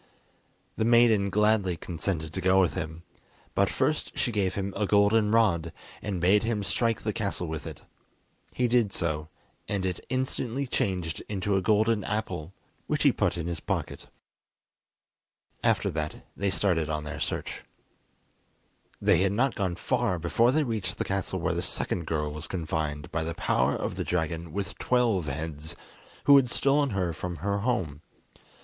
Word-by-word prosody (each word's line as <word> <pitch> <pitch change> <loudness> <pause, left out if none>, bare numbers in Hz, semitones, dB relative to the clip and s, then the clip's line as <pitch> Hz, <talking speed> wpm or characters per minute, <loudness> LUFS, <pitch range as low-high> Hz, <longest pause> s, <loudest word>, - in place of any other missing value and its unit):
The - - +1
maiden 115 -3 +5
gladly 105 -3 +2
consented 80 -2 -3
to 95 - -3
go 95 +1 +4
with 90 -3 +3
him, 80 -2 -5 0.5
but - - +3
first - - -1
she 120 - +1
gave 100 -4 0
him 100 0 -2
a 105 0 0
golden 105 +1 +4
rod, 105 -8 +3 0.3
and 100 -3 -3
bade 95 +4 +4
him 115 -3 -1
strike 115 +3 0
the 105 - -1
castle 100 -4 -2
with 80 0 -5
it. 80 -4 -9 0.7
He 125 - +1
did 120 -4 +3
so, 80 -3 -2 0.4
and 100 -2 -1
it 90 -2 -1
instantly 130 0 -1
changed 90 -9 -1
into 100 -1 0
a 95 - +2
golden 110 +1 +2
apple, 95 -6 -3 0.4
which - - 0
he - - +6
put - - 0
in 85 - -3
his 85 -1 -3
pocket. - - -3 1.6
After - - +2
that, 75 -1 -4
they 100 - 0
started 90 -5 +1
on 75 -1 -2
their 75 - -6
search. - - -3 1.4
They - - +4
had 95 +1 +2
not 125 +4 +2
gone 95 -4 -1
far 90 +1 0
before 100 +9 +3
they 155 +3 +2
reached 105 -6 -3
the - - -1
castle 95 -1 -2
where 85 0 0
the 85 - -1
second 85 -1 -2
girl 75 -2 -1
was 75 +2 -6
confined 80 -4 -3
by 80 0 -1
the 85 +1 -4
power 70 -3 +1
of - - -3
the - - -1
dragon 85 -1 -2
with 100 +3 -4
twelve 115 -9 +2
heads, 75 +2 -4 0.5
who 140 0 +8
had 130 -3 +3
stolen 140 +3 +2
her 95 -6 -1
from 90 +2 -5
her 100 +6 -1
home. 95 - -1
95 Hz, 170 wpm, -28 LUFS, 80-110 Hz, 1.6 s, who